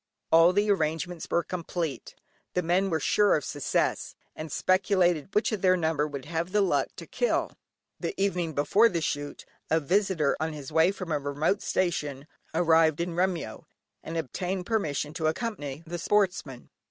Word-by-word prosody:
All 165 +2 +7
the 205 +2 +2
arrangements 165 -1 -1
were 170 - +1
complete; 170 -4 -4 0.4
the 180 - +1
men 180 +4 +2
were 160 -3 0
sure 205 +7 +3
of 150 - -2
success, 145 -2 -1 0.2
and 155 -1 -7
speculated 185 -3 +2
which 220 +5 +2
of 215 -4 -2
their 185 -1 +4
number 160 -3 0
would 140 -3 -7
have 165 +3 -3
the 210 +1 +3
luck 195 - +2
to - - -9
kill. - - 0 0.5
The - - -4
evening 180 -5 0
before 200 +11 +4
the 170 - -1
shoot, 145 -1 -4 0.2
a 160 - +3
visitor 175 -2 +1
on 160 +1 -2
his 145 -2 -8
way 160 +3 +4
from 185 -4 -7
a 150 - +1
remote 145 +8 0
station, 150 -6 -1 0.3
arrived 160 -2 +3
in 170 0 -2
Remyo, 180 -1 -2 0.4
and 165 - -5
obtained 180 +5 -3
permission 155 -9 -1
to 160 -1 -1
accompany 155 - -3
the 175 +1 -5
sportsmen. 180 -10 0
170 Hz, 165 wpm, -27 LUFS, 155-185 Hz, 0.5 s, All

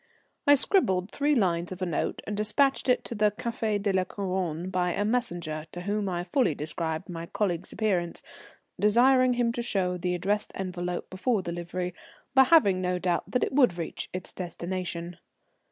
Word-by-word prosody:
I 285 - +9
scribbled 200 - +2
three 290 +1 +1
lines 175 -6 +1
of 185 - -6
a 185 - -1
note 170 -4 -2
and 210 - -3
despatched 260 +7 +2
it 250 -1 +3
to - - -5
the 210 -1 +3
Café 215 0 -2
de 200 -1 0
la 185 -1 +3
Couronne 185 -3 -3
by 180 -2 +1
a 205 - 0
messenger 175 -10 -2
to 175 - -5
whom 205 +1 -1
I 175 -1 -2
fully 180 - +1
described 160 +3 -3
my 170 -2 -6
colleague's 185 -3 -2
appearance, 185 -6 -1 0.6
desiring 250 +4 +5
him 240 -1 +1
to 240 - -3
show 190 -6 -1
the 180 0 -1
addressed 200 +4 -1
envelope 180 -2 -4
before 190 +2 0
delivery, 175 +1 -4 0.4
but 265 -1 +6
having 200 - +5
no 180 0 0
doubt 180 -1 -1
that 250 - +1
it - - -1
would 250 -10 +4
reach 165 - -5
its 185 0 -6
destination. 175 -1 -5
185 Hz, 175 wpm, -28 LUFS, 175-220 Hz, 0.6 s, I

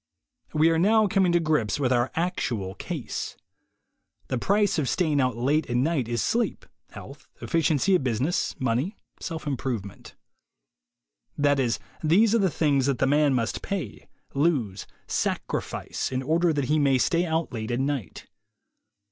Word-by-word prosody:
$Ve 155 +1 +5
are 165 - +2
now 215 +4 +4
coming 195 -3 +2
to 175 - +4
grips 150 -9 0
with 130 -3 +2
our 120 +1 +1
actual 125 - -2
case. - - -5 0.9
The 130 - -1
price 205 - +2
of 135 -5 0
staying 155 -6 +1
out 125 -3 0
late 140 +5 +1
at 120 - -1
night 135 -2 +1
is 120 -2 -1
sleepy 235 0 -1 0.2
health, - - -12
efficiency 165 +2 +1
at 180 - +3
business, 130 +7 -1
money, 130 - -1 0.2
self 165 -2 -5
improvement. 125 -8 -4 1.2
That 145 -1 +3
is, 120 -4 +1 0.3
these 200 +8 +4
are 230 - +4
the 195 -2 +3
things 140 -5 +1
that 140 -3 +1
the - - +2
man 145 0 +3
must 115 -2 -1
pay, 100 - -5 0.2
lose, 135 - 0 0.2
sacrifice, - - -3
in 130 0 -2
order 165 +4 +2
that 145 -3 -1
he 155 +4 +2
may 140 -2 +3
stay 170 +6 +2
out 160 -3 -1
late 110 -2 -4
at 120 +1 -1
night. 135 - -3
145 Hz, 155 wpm, -26 LUFS, 125-170 Hz, 1.2 s, $Ve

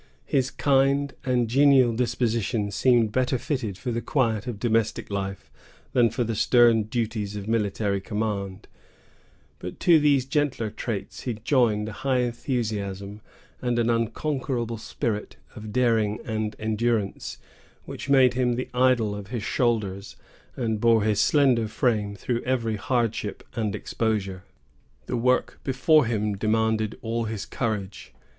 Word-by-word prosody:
His 135 -1 +1
kind 140 +1 +2
and 125 -2 +1
genial 130 -1 +5
disposition 115 -3 0
seemed 120 0 +3
better 130 +2 +1
fitted 120 -8 -3
for 125 - -4
the 115 0 -2
quiet 115 -5 0
of 120 -4 -4
domestic 110 -1 0
life 95 -1 -4 0.4
than 120 -2 +4
for 115 +3 -1
the 115 0 -2
stern 115 0 +4
duties 110 -2 -3
of 100 0 -6
military 105 -2 0
command; 100 -2 -3 0.9
but 90 - -7
to 170 -3 +6
these 145 -3 +3
gentler 135 -7 -1
traits 105 -3 -5
he 120 -3 -3
joined 110 -2 +1
a - - -5
high 130 +3 0
enthusiasm, 105 -5 -3 0.4
and 120 -1 0
an 120 0 +2
unconquerable 120 0 -2
spirit 110 -2 -3 0.2
of 110 -1 -8
daring 110 -3 +2
and 110 -1 -2
endurance, 110 -1 -1 0.5
which - - -7
made 130 -3 +5
him 125 -1 +1
the 125 - -4
idol 125 -4 +3
of 100 -1 -7
his 115 -1 -4
soldiers, 105 -6 -1 0.4
and 110 -4 -2
bore 115 -2 +4
his 105 -1 +2
slender 130 -6 +3
frame 105 -3 0
through 120 +4 -2
every 115 -4 -1
hardship 115 -4 -1
and 105 -3 -2
exposure. 105 -4 -2 0.6
The - - -3
work 125 +2 +1
before 135 +1 +3
him 105 -2 0
demanded 110 +1 0
all 115 0 -1
his 110 -2 -4
courage. 105 -5 -4
115 Hz, 140 wpm, -25 LUFS, 105-125 Hz, 0.9 s, to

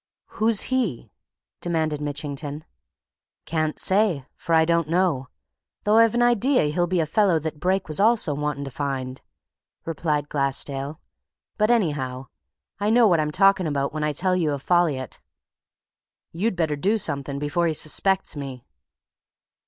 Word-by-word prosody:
"Who's 220 -1 +4
he?" 230 - -1 0.5
demanded 160 -3 -1
Mitchington. 145 +1 -5 0.8
"Can't 155 -1 -1
say, 190 -8 +1
for 170 -2 -1
I 160 0 +5
don't 170 -2 +1
know, 165 -7 +1 0.6
though 210 +1 +3
I've 230 0 +5
an 240 - +3
idea 240 - +3
he'll 175 +1 +1
be 180 0 0
a 160 - +2
fellow 185 +2 +2
that 155 -1 -5
Brake 185 +3 0
was 155 -1 -4
also 215 -7 +3
wanting 150 0 -3
to 135 - -7
find," 130 -2 -4 0.6
replied 150 -2 -1
Glassdale. 140 +1 -1 0.6
"But 215 +1 +1
anyhow, 135 - 0 0.5
I 205 +1 0
know 235 +1 +5
what 175 -4 +3
I'm 150 -1 0
talking 190 +1 +3
about 140 -2 -1
when 155 -1 -3
I 150 - +1
tell 185 +5 0
you 160 -5 0
of 140 -1 -5
Folliot. 155 -8 0 1.1
You'd 190 +5 -1
better 160 -4 0
do 200 +10 +1
something 140 -7 -1
before 150 +4 0
he 160 - -1
suspects 190 +5 +1
me." 135 -4 -7
160 Hz, 150 wpm, -24 LUFS, 145-190 Hz, 1.1 s, I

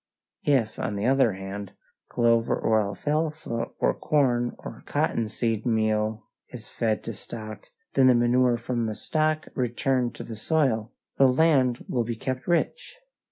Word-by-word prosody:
If, 130 -7 +2
on 105 - -2
the 100 +2 -2
other 130 -4 +3
hand, 95 +1 -7 0.4
clover 115 -1 +2
or 110 -1 +3
alfalfa 150 +4 -2
or - - +2
corn 125 -5 +1
or - - -9
cotton 115 - 0
seed 115 -1 -1
meal 110 -1 0 0.2
is 115 -4 -10
fed 110 -2 -1
to 115 - -5
stock, 110 +1 -9 0.3
and 130 -1 +5
the 125 - +6
manure 120 0 +3
from 120 0 -2
the 110 - -3
stock 155 +3 -1
returned 125 0 0
to - - -7
the 115 - -7
soil, 120 -3 0 0.3
the 135 - +7
land 130 -3 +3
will 120 -2 0
be 115 0 -3
kept 130 +3 -4
rich. 175 - -1
120 Hz, 155 wpm, -26 LUFS, 110-130 Hz, 0.4 s, the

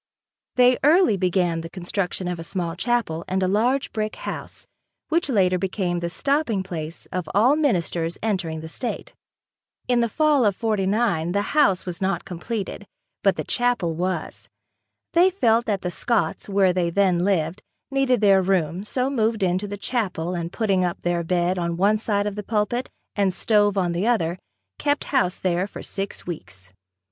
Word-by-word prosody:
They 250 0 +5
early 320 - +5
began 180 -3 +1
the 165 - -7
construction 185 +1 -2
of 180 -1 -3
a - - -5
small 170 -1 -3
chapel 210 -6 -1
and 190 +1 0
a - - +2
large 245 +8 +1
brick 215 0 -2
house - - -7 0.4
which 335 -1 +1
later 185 -6 +3
became 185 -2 -1
the 170 0 -3
stopping 260 - 0
place 165 -3 -6
of 180 -4 -3
all 240 +8 +5
ministers 175 - 0
entering 180 -7 -1
the 160 - -7
state. 240 +9 -5 0.7
In 245 -1 +3
the 235 -1 +1
fall 300 0 +3
of 205 -3 +2
'49 200 -5 0
the 200 0 +1
house 240 -12 +3
was 180 -1 -5
not 190 +1 -1
completed, 200 +2 -5 0.3
but 195 -1 +3
the - - -3
chapel 240 -9 0
was. 180 +3 -3 0.6
They 355 +2 +6
felt 235 - +2
that 200 -3 -1
the 180 - -2
Scotts, 230 +2 -1
where 195 -2 +3
they 175 -2 +1
then 180 -1 +2
lived, 180 -1 0 0.3
needed 270 -4 +2
their 195 -2 +5
room, 185 -1 0
so 250 +4 -1
moved 225 -5 0
into 185 +2 0
the 205 0 -5
chapel 190 -7 -2
and 170 -1 -3
putting 195 -5 +1
up 175 -1 -2
their 175 0 0
bed 180 +1 0
on 170 -1 -2
one 205 +4 +3
side 205 -2 0
of 210 - -2
the 210 - -4
pulpit 215 +4 -1 0.3
and 200 -2 +2
stove 205 0 +2
on 180 -2 +1
the 175 +6 -1
other, 180 -7 +1 0.4
kept 290 0 +1
house 215 -9 +2
there 180 +1 0
for - - -9
six 195 0 -5
weeks. 95 - -8
195 Hz, 175 wpm, -23 LUFS, 175-225 Hz, 0.7 s, They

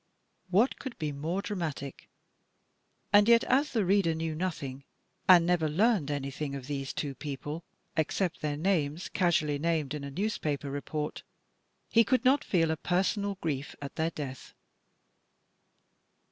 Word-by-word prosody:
What 210 +8 +3
could 260 -3 -7
be 155 -2 -2
more 160 +7 -2
dra 205 - -3
matic? 150 -6 -5 1.1
And 205 +1 +7
yet 235 0 +6
as 280 +3 +2
the 220 -5 +1
reader 185 -3 +3
knew 160 0 -2
nothing 150 -6 -4 0.5
and 175 -2 +8
never 170 -3 +2
learned 195 0 +2
anytliing 140 0 -3
of 130 - -9
these 135 -1 -3
two 145 -3 -3
people 145 +3 -5 0.3
except 165 +3 0
their 150 -1 -1
names, 160 -2 0
casually 160 -6 +1
named 155 -3 0
in 150 -2 -4
a 140 - -5
newspaper 150 -5 -2
report, 150 +2 -4 0.7
he 230 - +6
could 255 +2 +1
not 270 +3 +5
feel 165 -4 +2
a 160 - -1
personal 195 +4 0
grief 145 -3 -3
at 140 -1 -7
their 160 +1 +1
death. 140 -5 -7
160 Hz, 145 wpm, -30 LUFS, 145-190 Hz, 1.1 s, and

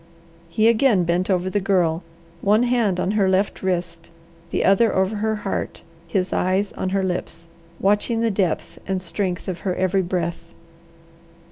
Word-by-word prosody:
He 215 +6 +2
again 230 -4 +4
bent 175 +3 0
over 185 -1 +1
the 205 +2 0
Girl, 180 -4 +1 0.4
one 210 +4 +3
hand 235 -7 +1
on 180 - 0
her 205 -3 +2
left 190 +2 0
wrist, 175 -3 -3 0.4
the - - 0
other 210 +4 +4
over 190 +3 +1
her 220 +1 0
heart, 195 - -3 0.2
his 185 +2 -1
eyes 190 +2 +1
on 190 - -3
her 195 0 0
lips, 180 -2 -4 0.3
watching 210 +3 +1
the 230 -1 +2
depth 190 -5 -1
and 190 -1 0
strength 185 0 -3
of 185 -2 -3
her 185 -2 -2
every 185 +1 +1
breath. 170 -2 -3
190 Hz, 160 wpm, -22 LUFS, 180-205 Hz, 0.4 s, again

